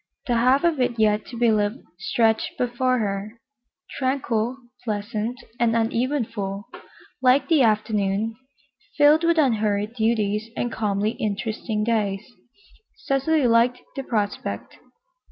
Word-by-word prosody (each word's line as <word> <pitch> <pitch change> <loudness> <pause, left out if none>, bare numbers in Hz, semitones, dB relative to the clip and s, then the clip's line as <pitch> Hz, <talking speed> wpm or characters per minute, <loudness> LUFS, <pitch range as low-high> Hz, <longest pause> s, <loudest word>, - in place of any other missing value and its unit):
The 245 - 0
half 255 +5 +3
of 335 -4 +2
it 240 -1 0
yet 215 -1 +2
to 240 - -8
be 235 -1 +3
lived 210 +4 0 0.2
stretched 220 +2 +1
before 250 +1 +1
her, 210 +1 -3 0.6
tranquil, 255 -3 0 0.3
pleasant 215 +2 -3 0.2
and 230 -1 +2
uneventful, 225 -4 -1 0.6
like 260 +2 +4
the 320 -4 +5
afternoon, 215 -1 +1 0.6
filled 295 +2 +5
with 335 0 +3
unhurried 215 -6 +1
duties 220 -2 0
and 240 - -1
calmly 210 -1 0
interesting 220 -1 -3
days, 210 -3 0 0.7
Cecily 275 +2 +1
liked 235 +1 +4 0.2
the 275 - -3
prospect. 210 -6 -3
230 Hz, 120 wpm, -23 LUFS, 210-255 Hz, 0.7 s, the